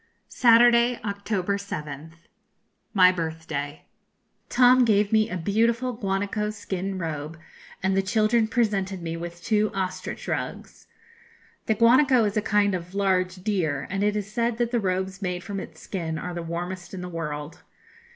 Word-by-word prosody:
] - - -48 0.2
Saturday, 235 +1 +6
October 200 -1 -1
7th. 160 -3 -7 0.7
My 185 -4 +6
birthday. 160 -4 -4 0.6
Tom 250 +1 +6
gave 210 -3 +3
me 220 0 +3
a 185 - -3
beautiful 230 +7 +1
guanaco 205 0 -2
skin 195 -2 -4
robe, 160 -2 -4 0.5
and 190 0 +2
the 195 - +3
children 220 +3 +2
presented 200 -6 0
me 165 0 -3
with 170 0 -7
two 215 -1 +2
ostrich 185 -1 -4
rugs. - - -5 0.8
The 220 - +2
guanaco 245 +3 +5
is 205 0 -1
a 215 - +2
kind 205 -1 +2
of 180 +1 -5
large 185 -2 +1
deer, 180 -9 -1
and 195 +1 -1
it 210 0 +1
is 205 0 -4
said 235 0 0
that 240 -1 0
the 240 - +2
robes 190 0 -2
made 180 -2 -3
from 200 +2 -4
its 160 -3 -9
skin 165 -5 -4
are 180 +3 -5
the 175 - -4
warmest 175 +2 -5
in 180 - -6
the 180 - -5
world. 150 -3 -5
195 Hz, 160 wpm, -25 LUFS, 175-215 Hz, 0.8 s, Saturday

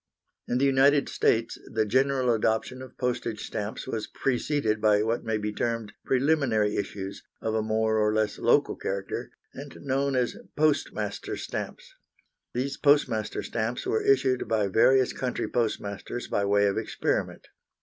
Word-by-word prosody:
In 120 - 0
the 135 - +3
United 140 +1 +4
States 115 0 +1
the 110 0 +1
general 130 +2 +2
adoption 110 +3 0
of 130 - -11
postage 120 -3 -2
stamps 105 +1 -4
was 115 -4 -3
preceded 125 -4 0
by 105 -1 +4
what 115 +2 -1
may 110 -1 -1
be 105 0 -3
termed 115 -2 -2
preliminary 130 -6 +2
issues, 100 -1 -4 0.2
of 110 - -2
a 110 - +1
more 110 0 +1
or 105 0 +3
less 110 -1 0
local - - +3
character, 95 0 -4 0.2
and 140 +1 -9
known 140 0 0
as 125 -2 0 0.2
"Postmaster 155 -1 0
stamps." - - -6 0.6
These 135 +3 -2
"Postmaster 130 -7 +2
stamps" 115 +2 -3
were 110 - +1
issued 130 -2 +2
by 105 -3 +1
various 130 +5 +4
country 125 -1 -2
postmasters 110 0 -3
by 100 - 0
way 100 0 +3
of 100 - +1
experiment. - - -2
115 Hz, 150 wpm, -27 LUFS, 110-130 Hz, 0.6 s, United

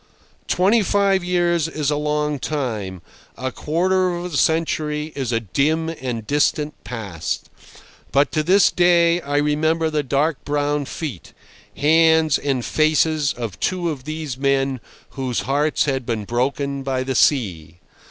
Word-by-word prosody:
Twenty 200 +6 +3
five 195 -1 +2
years 175 -2 +1
is 150 -3 -2
a - - +1
long 150 0 -1
time—a 120 - -5
quarter 185 +7 +1
of 175 0 -6
a - - -2
century 155 -1 0
is 130 -4 -2
a 115 - +1
dim 155 - 0
and 125 -8 -5
distant 145 +2 +1
past; 100 -9 -5 0.6
but 140 +1 +3
to 155 - +1
this 185 +5 +4
day 175 -1 +3
I 145 -1 -2
remember 155 +2 +1
the 150 -1 +1
dark 145 +2 0
brown 145 0 -1
feet, 135 - -7 0.4
hands, 160 +1 +4
and 135 -4 -1
faces 155 -1 +2
of 115 -6 -6
two 180 -3 -1
of 135 -4 -8
these 155 -4 -5
men 135 -1 +1 0.3
whose 130 -3 -2
hearts 145 +3 +1
had 135 -3 -1
been 110 -3 -2
broken 140 +4 -1
by 135 -1 -2
the 130 0 -2
sea. 90 - +1
150 Hz, 145 wpm, -21 LUFS, 130-160 Hz, 0.6 s, this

